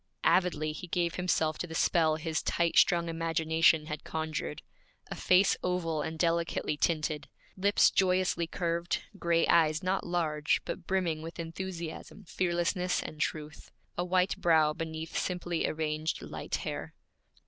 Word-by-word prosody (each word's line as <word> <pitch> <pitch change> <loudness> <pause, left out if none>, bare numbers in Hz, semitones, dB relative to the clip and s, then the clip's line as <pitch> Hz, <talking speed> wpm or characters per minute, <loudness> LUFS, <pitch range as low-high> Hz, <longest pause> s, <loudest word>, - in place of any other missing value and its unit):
Avidly 155 -4 +2
he 155 +4 -8
gave 170 -1 0
himself 160 -4 0
to 175 - -3
the 160 - -7
spell 160 -2 +3
his 155 0 -2
tight 170 -1 0
strung 170 -1 +4
imagination 165 -1 +2
had 155 -1 -6
conjured 155 - -4 0.5
a - - 0
face 185 +2 +4
oval 165 -4 -1
and 160 +2 -4
delicately 165 -2 0
tinted; 155 -1 -1 0.3
lips 200 +2 +4
joyously 185 -2 +2
curved; 170 0 -2 0.2
gray 170 -1 +2
eyes 155 +1 +3
not 185 +1 0
large, 155 -4 0
but 175 - -6
brimming 175 -5 0
with 165 +1 -8
enthusiasm, 170 +3 -6
fearlessness, 180 0 0
and 155 - -7
truth; 150 -1 -4 0.3
a 175 - -1
white 180 +1 +1
brow 160 -4 +3
beneath 160 -1 -6
simply 175 -2 -1
arranged 155 0 -2
light - - -4
hair. - - -5
165 Hz, 140 wpm, -30 LUFS, 155-180 Hz, 0.5 s, strung